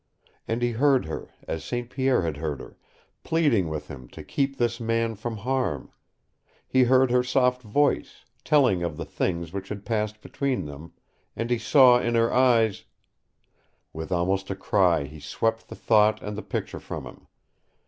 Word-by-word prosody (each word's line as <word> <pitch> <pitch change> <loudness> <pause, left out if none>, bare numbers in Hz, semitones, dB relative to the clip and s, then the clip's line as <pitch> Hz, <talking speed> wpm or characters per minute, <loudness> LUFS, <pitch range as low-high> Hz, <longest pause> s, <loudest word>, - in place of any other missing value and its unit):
And 115 +2 -1
he 120 - +2
heard 135 +2 +3
her, 80 - -6 0.2
as 80 - -4
St. 120 -1 -3
Pierre 130 -4 +1
had 80 -3 -2
heard 75 -2 -3
her, - - -11 0.5
pleading 145 - +2
with 75 -1 -5
him 65 -3 -10
to - - -11
keep 135 -1 -1
this 120 -1 0
man 115 0 0
from 110 +2 -5
harm; 125 - -2 0.8
he 130 -1 +4
heard 130 0 +4
her 125 0 +4
soft 125 0 +1
voice, 140 +6 0 0.2
telling 130 - +3
of 85 -3 -3
the - - -5
things 85 -3 -2
that 100 +1 -5
had 100 -1 -7
passed 105 -1 -2
between 135 - -2
them, 75 +3 -10 0.4
and 115 +1 -3
he 120 - +2
saw 125 +1 +6
in 120 -1 -1
her 115 0 +2
eyes 120 -5 +3 1.1
With 80 0 -6
almost 95 +2 0
a 95 - -2
cry 90 -5 +2
he 75 +2 -10
swept 115 +10 -2
the - - -8
thought 110 -1 +3
and 105 0 -5
the 105 - -5
picture - - -4
from - - -7
him. - - -13
115 Hz, 175 wpm, -25 LUFS, 90-125 Hz, 1.1 s, saw